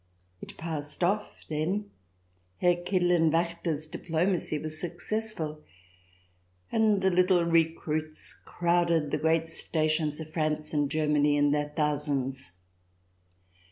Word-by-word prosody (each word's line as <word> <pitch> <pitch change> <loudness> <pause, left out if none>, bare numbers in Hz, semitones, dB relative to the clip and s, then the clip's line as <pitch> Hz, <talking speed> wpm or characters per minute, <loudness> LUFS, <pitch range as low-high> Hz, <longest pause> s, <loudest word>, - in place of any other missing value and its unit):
It - - -9
passed 155 -1 -4
off 205 +4 -1
then; 180 +7 -2 0.7
Herr 175 0 +3
Kidderlen 175 -2 +2
Waechter's 165 -1 -1
diplomacy 165 0 -1
was 155 +1 -3
successful, 175 -3 -3 1.1
and 215 -3 +3
the 190 - +4
little 180 0 +4
recruits 160 -2 0
crowded 170 -3 +1
the 150 - 0
great 160 +1 +2
stations 155 -1 0
of 155 -1 -8
France 155 -1 0
and 145 -2 +1
Germany 150 -1 +2
in 145 0 +3
their 150 0 0
thousands. 145 - -1
160 Hz, 110 wpm, -28 LUFS, 150-175 Hz, 1.1 s, the